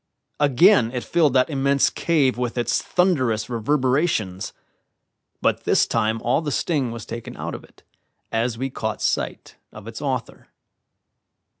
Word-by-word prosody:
Again 145 - +5
it 125 - -3
filled 155 -6 +2
that 130 +3 +3
immense 140 0 +2
cave 145 -6 +1
with 125 0 -3
its 120 -1 +1
thunderous 130 - +1
reverberations; 125 - 0 0.9
but - - +1
this - - +4
time 110 +1 0
all 120 +6 +2
the 150 -2 -3
sting 140 -4 0
was 115 -1 -7
taken 115 -1 -7
out - - -5
of - - -7
it, - - -21 0.5
as 115 +1 -1
we 135 +2 -3
caught 110 -3 -3
sight - - -2
of 110 0 -12
its 115 -1 -7
author. 130 -5 -4
125 Hz, 145 wpm, -23 LUFS, 115-145 Hz, 0.9 s, Again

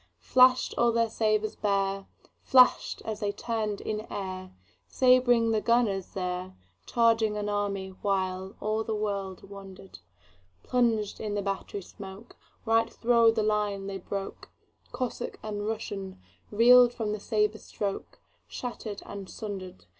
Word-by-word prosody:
Flash'd 255 0 +4
all 235 0 +4
their 230 -1 +1
sabres 215 -1 0
bare, 195 -1 -1 0.3
Flash'd 255 -2 +4
as 220 -1 -4
they 205 -2 -1
turn'd 215 -1 -3
in 215 -1 -3
airSabring 190 - +1
the 215 -1 +1
gunners 225 -6 +1
there, 180 0 -3 0.3
Charging 225 -2 +2
an 210 0 -2
army, 200 -2 -2
whileAll 195 +2 -1
the 220 0 -2
world 200 -3 -3
wonder'd:Plunged 190 - -4
in 210 -1 -3
the 205 - -1
battery 195 0 -4
smokeRight 225 +3 -4
thro' 235 -1 +4
the 225 -1 +1
line 210 -2 0
they 195 -1 -5
broke; 195 +2 -6 0.4
Cossack 255 -2 -4
and 210 -1 -4
RussianReel'd 210 - +2
from 215 -2 -2
the 210 - -3
sabre 210 0 0
strokeShatter'd 210 +2 -6
and 200 -2 -8
sunder'd. 190 - -7
205 Hz, 115 wpm, -28 LUFS, 195-225 Hz, 0.4 s, Flash'd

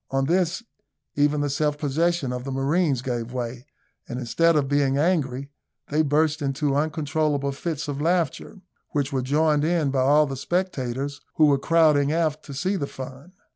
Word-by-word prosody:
On 135 0 0
this, 180 - +1 0.5
even 145 0 +2
the 145 - 0
self 150 +1 0
possession 150 -1 0
of 125 0 -4
the 135 - -5
marines 135 0 +1
gave 120 -2 -3
way; 125 +1 -5 0.4
and 125 - -4
instead 165 +7 +2
of 145 -3 +2
being 140 -1 +2
angry, 140 -4 0 0.4
they 150 +2 +2
burst 155 +1 +1
into 140 0 0
uncontrollable 150 -1 0
fits 150 +2 -4
of 145 0 -4
laughter, 175 +4 -1 0.3
which 145 -1 -1
were 130 - +1
joined 150 +3 +2
in 160 -3 +1
by 135 -1 +1
all 145 +3 +5
the 135 -2 -5
spectators, 140 -4 -2
who 155 - +5
were 140 -2 +3
crowding 150 -2 +3
aft 155 -2 0
to 145 - -8
see 185 +9 -1
the 140 - -2
fun. 135 +7 -9
145 Hz, 175 wpm, -24 LUFS, 135-160 Hz, 0.5 s, all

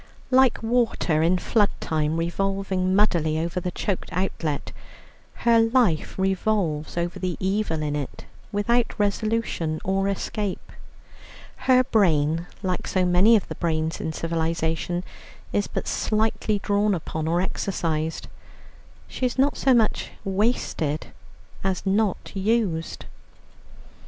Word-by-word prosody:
Like 255 -3 +4
water 225 -9 +1
in 170 +3 +3
flood 205 +2 +2
time 155 0 -1
revolving 190 +2 0
muddily 170 -7 +2
over 170 +3 -1
the 180 - -3
choked 185 +1 -3
outlet, 170 -5 -2 0.7
her 230 -1 +6
life 225 -8 +2
revolves 190 -5 0
over 170 0 -2
the 180 -2 -2
evil 190 -5 0
in 145 -1 -1
it 145 -3 -5 0.3
without 230 +3 +1
resolution 205 -6 0
or 195 +1 +1
escape; 200 0 -3 1.0
her 255 0 +7
brain, 165 -7 +2 0.2
like 185 -1 -2
so 185 -1 +1
many 180 +6 +5
of 210 - +1
the - - -5
brains 160 -1 -1
in 160 - -2
civilization, 165 +1 -1 0.5
is 205 - +1
but - - -4
slightly 215 -1 0
drawn 205 0 +1
upon 160 -1 -4
or 170 +2 +2
exercised; 165 -4 -2 0.8
she 255 - -1
is 245 - -5
not 275 +2 +3
so 270 - +2
much 230 -4 +2 0.2
wasted 190 -7 -1 0.5
as 190 0 -1
not 200 0 0
used. 195 -5 -1
190 Hz, 120 wpm, -24 LUFS, 165-215 Hz, 1.0 s, her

